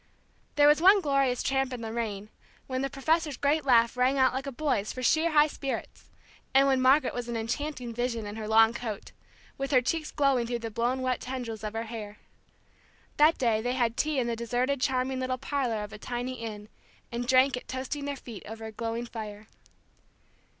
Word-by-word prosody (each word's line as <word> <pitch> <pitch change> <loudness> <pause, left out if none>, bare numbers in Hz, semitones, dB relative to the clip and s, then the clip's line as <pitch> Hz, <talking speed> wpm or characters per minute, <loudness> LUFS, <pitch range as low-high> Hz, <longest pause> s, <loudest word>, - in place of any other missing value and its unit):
There 290 -1 +6
was 300 +2 +5
one 390 +3 +7
glorious 275 -6 +1
tramp 270 -1 0
in 250 -2 -5
the 225 -1 -5
rain, 215 -3 -3 0.4
when 255 -1 -3
the 275 - -1
professor's 305 +1 0
great 290 +2 +1
laugh 235 -2 +4
rang 255 +2 +2
out 260 -1 +4
like 265 +2 -3
a - - -3
boy's 260 -7 -1
for 255 - -6
sheer 320 +6 +3
high 300 -2 +5
spirits, 275 -3 -5 0.5
and 270 +1 +7
when 265 -1 +3
Margaret 270 +4 +4
was 245 -1 -4
an 235 - -2
enchanting 245 +2 -3
vision 235 -2 -2
in 205 0 -6
her 220 -1 -5
long 225 +1 +5
coat, 225 -4 -6 0.5
with 275 0 -2
her 260 - +5
cheeks 305 +5 -2
glowing 270 -5 +1
through 240 0 -1
the 225 - -4
blown 240 +4 -1
wet 255 -1 -1
tendrils 245 -4 -5
of 215 0 -4
her 225 +1 -2
hair. 220 -2 -7 1.0
That 305 +2 +5
day 230 -4 +1
they 245 +2 -1
had 235 -3 0
tea 305 +2 0
in 255 - +1
the 235 0 -1
deserted 250 +4 -1
charming 260 0 0
little 255 0 -1
parlor 255 -5 -2
of 210 - -8
a 210 - -9
tiny 245 +3 -4
inn, 210 -2 -7 0.4
and 240 +1 -3
drank 260 +1 +4
it 250 - -8
toasting 265 +2 -4
their 285 0 -3
feet 235 -6 -9
over 220 +1 -7
a 220 - -6
glowing 230 +2 -3
fire. 215 -2 -8
250 Hz, 205 wpm, -28 LUFS, 230-275 Hz, 1.0 s, one